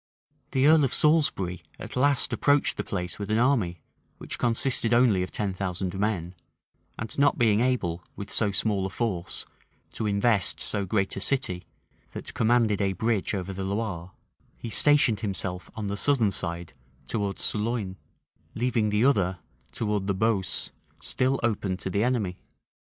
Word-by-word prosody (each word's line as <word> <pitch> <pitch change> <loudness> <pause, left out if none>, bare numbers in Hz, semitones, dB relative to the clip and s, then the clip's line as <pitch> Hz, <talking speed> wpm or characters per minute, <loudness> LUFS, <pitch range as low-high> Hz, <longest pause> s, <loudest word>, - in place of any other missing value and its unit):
The 130 0 +2
earl 155 0 +6
of 135 - +2
Salisbury 140 - +2 0.2
at - - -8
last 140 +1 +2
approached 145 0 +2
the - - -1
place 90 -2 -4
with 100 0 -4
an 110 - +2
army, 110 - +1 0.4
which - - -6
consisted 120 0 +1
only 120 -6 +4
of 90 - -2
ten 100 -3 -2
thousand 95 -1 -3
men; 95 -5 -1 0.6
and 110 -1 -6
not 145 0 +4
being 110 -3 +3
able, 115 -9 0
with 100 0 -7
so 110 - +2
small 100 -1 0
a - - -7
force, 95 -4 -3 0.5
to 110 - -3
invest 100 0 +2
so 100 -2 -2
great 95 0 0
a - - -3
city, 110 -10 +1 0.5
that - - -7
commanded 115 -3 +2
a 95 -1 +1
bridge 110 +1 0
over 95 0 -4
the 95 +1 -4
Loire, 95 -3 -3 0.5
he 115 - -7
stationed 145 -5 +4
himself 95 -4 -4
on 110 -2 -4
the 100 0 -2
southern 115 -2 +2
side 85 -4 -3 0.3
towards 100 -3 -1
Sologne, 105 -3 -1 0.6
leaving 115 -2 +1
the 105 +3 +2
other, 95 -9 +2 0.3
towards 105 -3 -2
the 100 - +1
Beausse, 100 -3 0 0.3
still 130 +1 0
open 100 -5 0
to 95 - -5
the 100 +3 +1
enemy. 115 -8 0
105 Hz, 160 wpm, -27 LUFS, 95-120 Hz, 0.6 s, earl